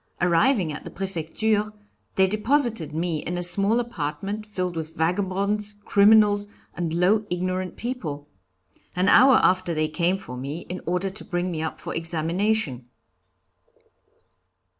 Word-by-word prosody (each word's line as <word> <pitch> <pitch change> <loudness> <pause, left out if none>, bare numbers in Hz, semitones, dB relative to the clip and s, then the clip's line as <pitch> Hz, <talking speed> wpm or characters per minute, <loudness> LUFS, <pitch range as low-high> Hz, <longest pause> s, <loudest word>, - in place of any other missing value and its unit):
Arriving 180 - +2
at 145 - -7
the - - -8
Prefecture, 200 +4 -1 0.4
they 190 - +5
deposited 215 - +1
me 165 0 -1
in 175 +1 -3
a 175 - -2
small 200 +6 +3
apartment 200 0 -4
filled 180 -4 -3
with 160 0 -5
vagabonds, 200 +4 -1
criminals, 205 0 +5 0.3
and 170 -2 -3
low, 185 +6 +2
ignorant 185 0 -2
people. 160 - -5 0.7
An 180 +2 +1
hour 255 +5 +7
after 185 -2 +2
they 155 0 +1
came 175 +4 0
for 125 - -8
me 140 +6 -5
in 180 +1 -7
order 180 +2 0
to 200 - -7
bring 180 0 -2
me 160 -2 -3
up 160 - -4
for - - -5
examination." 165 - -1
185 Hz, 140 wpm, -24 LUFS, 165-205 Hz, 0.7 s, hour